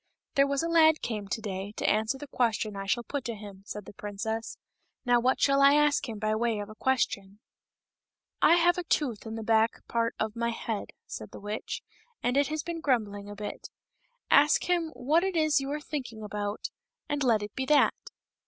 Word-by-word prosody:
"There 275 0 +4
was 280 +2 0
a - - 0
lad 320 -2 +5
came 210 -4 -3
to 220 - -3
day 195 0 -5
to - - -2
answer 220 +5 +1
the 290 - -8
question 225 -5 0
I 195 0 -5
shall 240 +4 +1
put 280 +2 -4
to 235 - -3
him," 200 -2 -10
said 210 -1 -6
the - - -11
princess. 220 +3 -4 0.2
" - - -48
Now 245 -1 +4
what 255 +2 +2
shall 275 0 +4
I 280 +1 +7
ask 295 -3 +3
him 220 - -5
by 215 +1 0
way 225 0 0
of 205 0 -5
a - - -9
question 210 -5 -1 0.3
?" - - -64
" - - -55
I - - +8
have 350 +1 +3
a - - -2
tooth 255 -10 -1
in 220 - -5
the 225 - -5
back 225 0 +2
part 230 0 0
of 220 0 -2
my 235 0 0
head," 225 -2 -3 0.2
said 110 - -7
the - - -10
witch, 210 +1 -5 0.2
" 480 -1 -40
and 245 +1 +1
it 280 0 +3
has 310 -1 -3
been 335 -1 -5
grumbling 205 -7 0
a 205 - -7
bit; 205 0 -6 0.6
ask 290 +1 +5
him 345 -2 +1
what 305 +7 +2
it 385 -2 -1
is 310 -3 +3
you 270 - -4
are 300 - -2
thinking 255 -8 -6
about, 205 0 -4 0.4
and 290 -1 -1
let 225 -5 +3
it 205 - -7
be 265 0 -3
that." 300 -1 +5
235 Hz, 225 wpm, -29 LUFS, 210-290 Hz, 0.6 s, I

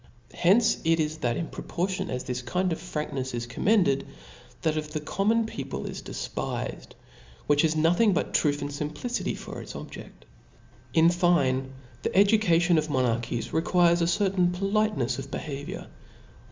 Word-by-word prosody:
Hence 215 +6 +4
it 165 0 +3
is^^ 155 0 -1
that 120 -4 0
in 170 - -2
proportion 185 +3 -3
as 125 0 -3
this 125 0 -3
kind 180 +8 0
of - - -5
franknefs 150 -6 -4
is 120 0 -3
Commended, 140 - +2 0.6
that 160 -1 +1
of 150 -1 -4
the 155 - -1
common 210 +9 +1
peo* 140 -11 -5
pie 70 - -5
is - - -6
defpifed, - - -5 0.5
which 145 0 +4
has 160 -1 +2
nothing 175 +8 +4
t>ut - - -1
truth 145 -2 +2
and 145 - -4
fimpHcity 150 - -3
for - - -7
its - - -9
objeft. - - -10 0.7
In 165 +1 +6
fine, 135 -7 +2 0.3
the - - -2
education 180 -5 +4
of 155 0 -3
monarchies 120 -4 -1
requires 170 +1 +3
a 170 - +2
certain 185 0 +2
politenefs 195 - 0
of 135 0 -7
behaviour. 140 0 -5
160 Hz, 155 wpm, -27 LUFS, 140-180 Hz, 0.7 s, In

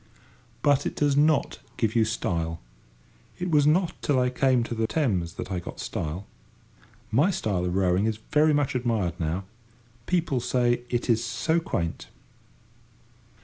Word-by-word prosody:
But 145 -1 +3
it - - -5
does 145 -2 +2
not 150 0 +2 0.2
give 115 -1 0
you 115 -1 +4
style. 85 -7 -2 0.8
It 180 -1 -3
was 145 -2 +4
not 170 +3 +3
till 140 -3 +2
I 125 0 +1
came 130 -1 +2
to 120 - -4
the 110 -1 0
Thames 95 - 0
that 95 - -6
I 90 - -1
got 85 - -9
style. 80 +6 -4 0.9
My 140 - +4
style 100 - -1
of 90 0 -1
rowing 95 +2 +2
is 110 -1 -1
very 150 +1 +4
much 145 -2 +1
admired 115 -9 -1
now. 85 +3 -1 0.6
People 170 -7 +1
say 120 0 +1
it 120 0 -1
is 115 -1 +2
so 160 +7 0
quaint. 85 - -3
120 Hz, 155 wpm, -26 LUFS, 95-145 Hz, 0.9 s, you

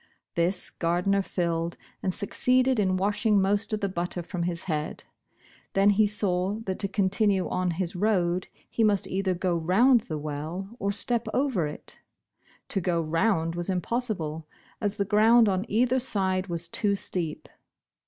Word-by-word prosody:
This 175 +2 0
Gardner 180 +4 +1
filled, 170 -3 -2 0.2
and 185 - 0
succeeded 250 +6 +2
in 185 -2 +2
washing 205 +2 +2
most 200 +3 +1
of 215 0 -2
the 200 - +1
butter 175 -1 -3
from 175 +1 -5
his 170 0 -1
head. 155 -3 -3 0.7
Then 195 +1 +4
he 210 +1 +3
saw 195 -2 0
that 190 -1 -3
to 200 - 0
continue 195 0 +1
on 180 0 -1
his 180 -1 -3
road, 180 -3 +1 0.2
he 230 - -1
must 205 -3 +2
either 190 -1 -1
go 180 0 0
round 205 +10 +4
the 155 -6 -5
well, 155 +8 -5
or 200 - 0
step 235 +3 +3
over 255 - +1
it. 150 - -10 0.7
To 195 - 0
go 175 -1 0
round 165 +1 +1
was 175 +2 -4
impossible, 180 -5 -2 0.3
as 205 -1 -1
the 200 - 0
ground 225 +3 +5
on 190 +1 0
either 250 +4 +2
side 190 -6 0
was 170 -1 -3
too 200 +3 0
steep. 170 -5 -4
190 Hz, 160 wpm, -27 LUFS, 175-210 Hz, 0.7 s, ground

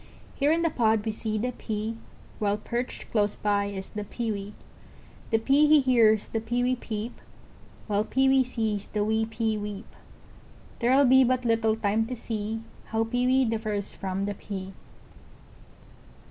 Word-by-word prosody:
Here 285 +1 +2
in 335 +1 +2
the 330 - +2
pod 220 -4 +2
we 220 - 0
see 215 0 -3
the 250 +4 -1
Pea, 220 -1 -4 0.4
While 205 -1 +1
perched 240 +3 -4
close 210 -2 +1
by 205 -1 +1
is 195 -1 -6
the 210 - -5
Pewee; 210 -2 -4 0.8
The 225 - +3
Pea 275 +6 +4
he 305 0 +7
hears 230 -5 +4
the 225 - -2
Pewee 245 +3 0
peep, 225 -1 -5 0.7
While 205 -1 +1
Pewee 265 +2 +3
sees 220 -5 -2
the 210 -1 -1
wee 220 +1 +1
Pea 220 -1 -1
weep, 205 +1 -6 0.9
There'll 260 +4 +4
be 265 +1 +7
but 255 0 +1
little 225 -1 +2
time 220 +1 0
to 250 - -4
see, 225 -1 -4 0.2
How 225 0 0
Pewee 250 +3 +2
differs 215 -3 -2
from 195 0 -3
the 205 - -2
Pea. 195 -1 -7
225 Hz, 155 wpm, -27 LUFS, 210-245 Hz, 0.9 s, he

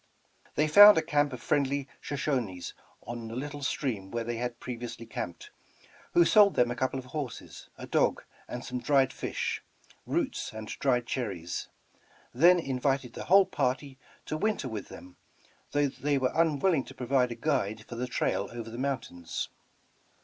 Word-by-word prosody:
They 150 - +3
found 205 +6 +10
a 160 - +3
camp 145 -2 +1
of 125 -2 -8
friendly 140 -1 +1
Shoshonies 125 - -2 0.3
on 120 -1 -6
the 115 - -7
little 145 +3 -5
stream 120 -8 -2
where 115 +2 -2
they 120 0 -3
had 120 0 -4
previously 120 -1 -6
camped, 90 -6 -6 0.6
who 170 - +7
sold 205 0 +6
them 120 -1 +3
a - - -2
couple 130 +2 -1
of 130 - -6
horses, 135 -2 -7
a - - -7
dog, - - +1 0.2
and 120 - -6
some 125 0 -3
dried 135 0 +3
fish, - - -3 0.5
roots - - -1
and 110 0 -7
dried 125 -3 +2
cherries; 95 -10 -3 0.7
then 170 +8 +6
invited 135 -4 -1
the - - -7
whole 195 +2 +6
party 135 -2 -2 0.3
to 155 - -3
winter 210 -6 0
with 110 -4 -5
them, 90 +1 -12 0.5
though 145 0 +2
they 140 +1 -1
were 130 -1 +1
unwilling 160 -1 +2
to 135 - -12
provide 125 0 +1
a - - -4
guide 110 -5 -1
for - - -8
the 125 +2 -3
trail 100 -5 -1
over 115 -1 -7
the 120 - -7
mountains. 130 -11 -3
130 Hz, 165 wpm, -29 LUFS, 115-145 Hz, 0.7 s, found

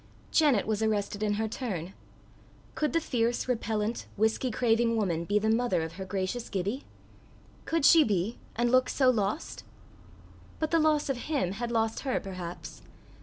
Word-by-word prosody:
Janet 285 -10 +4
was 215 0 -1
arrested 210 -1 -1
in 210 -1 +1
her 220 +2 -1
turn: 195 - -4 0.8
could 300 - 0
the 330 - +3
fierce, 240 -6 -1
repellent, 225 -2 -1
whisky 220 +4 +1
craving 230 0 +2
woman 170 -6 0
be 205 +4 +1
the 210 +1 +1
mother 225 -6 +2
of 160 - -5
her 190 +3 -7
gracious 195 +5 -3
Gibbie? 200 +8 -3 0.8
Could 330 -3 +1
she 325 +1 +8
be, 205 -2 -1 0.2
and 240 +1 +1
look 255 0 +4
so 260 -2 +4
lost? 215 +5 -2 0.9
But 315 -1 -2
the 330 - +4
loss 305 -1 +2
of 270 -3 -1
him 275 - 0
had 235 +4 -4
lost 225 -1 0
her 265 -2 -1
perhaps. 180 -3 -7
225 Hz, 165 wpm, -29 LUFS, 200-255 Hz, 0.9 s, she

